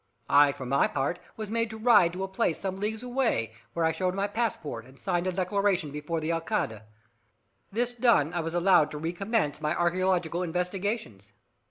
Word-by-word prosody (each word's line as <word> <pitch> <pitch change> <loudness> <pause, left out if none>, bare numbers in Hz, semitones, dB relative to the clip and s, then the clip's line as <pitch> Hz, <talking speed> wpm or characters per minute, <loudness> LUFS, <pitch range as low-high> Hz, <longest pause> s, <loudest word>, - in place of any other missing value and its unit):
I, 145 0 +7
for 135 -2 -8
my 135 +2 +3
part, 145 +6 -2 0.2
was 215 -1 -5
made 230 0 0
to 220 - -7
ride 215 -7 +5
to 185 +2 -4
a - - -2
place 190 -3 0
some 190 -1 -4
leagues 215 +3 -3
away, 245 - 0 0.2
where 165 - +1
I 160 - +3
showed 180 +3 -1
my 200 +1 0
passport, 205 - -2
and 130 +2 -17
signed 180 0 -1
a - - +1
declaration 185 -3 0
before 150 +3 -3
the 160 +1 -2
Alcalde. 165 -9 -1 0.9
This 240 +3 0
done, 230 - +3
I 175 - -1
was 165 +1 -3
allowed 175 -3 +4
to 150 - -6
recommence 175 0 -1
my 150 +1 0
archaeological 175 -1 +1
investigations. 180 - -3
180 Hz, 185 wpm, -28 LUFS, 155-205 Hz, 0.9 s, I